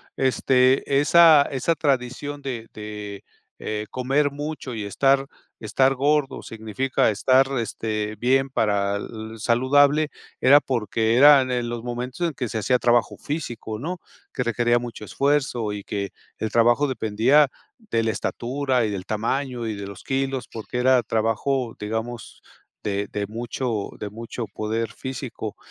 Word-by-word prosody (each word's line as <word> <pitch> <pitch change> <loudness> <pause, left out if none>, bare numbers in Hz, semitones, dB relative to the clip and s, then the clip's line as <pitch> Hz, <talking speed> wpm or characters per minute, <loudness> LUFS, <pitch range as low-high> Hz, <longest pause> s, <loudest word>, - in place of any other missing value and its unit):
este, 130 +1 +3
esa 160 -1 +7
esa 135 +5 0
tradición 140 0 -1
de 120 -5 -5
de, 105 -2 -7 0.4
eh, 105 0 -3
comer 135 +3 +1
mucho 145 -3 -5
y 110 - -4
estar 135 +6 +2 0.3
estar 130 +5 +2
gordo 145 +1 +1
significa 115 +4 -1
estar, 130 +5 +3
este, 110 -2 -3
bien 135 +3 +2
para-l 110 +1 -2
saludable 140 +6 +3 0.3
era 140 +3 +7
porque 115 -1 0
eran 140 -2 +7
en 120 -1 -1
los 120 -1 -4
momentos 125 +7 -3
en 165 - -4
que 125 - -3
se 110 - -3
hacía 125 +5 +2
trabajo 120 -3 +2
físico, 120 -8 -5
¿no?, 175 +8 -4 0.3
que 125 - -2
requería 120 0 +2
mucho 120 -2 -6
esfuerzo 130 -4 0
y 100 - -6
que 100 -1 -4 0.3
el 110 - -3
trabajo 120 +5 +4
dependía 130 +4 +3 0.3
de 165 - -1
la 110 - +1
estatura 130 +1 -1
y 105 - -2
del 95 -2 -5
tamaño 120 +3 -2
y 110 - -2
de 100 -1 -6
los 100 - -10
kilos 135 -1 -2
porque 115 +2 -6
era 125 0 +4
trabajo, 115 +3 -1
digamos, 110 +2 -5 0.4
de 100 -1 -2
de 105 -1 -2
mucho, 115 0 -3
de 105 -1 -5
mucho 115 +1 -6
poder 110 +2 -3
físico. 130 -4 -6
120 Hz, 145 wpm, -23 LUFS, 110-135 Hz, 0.4 s, esa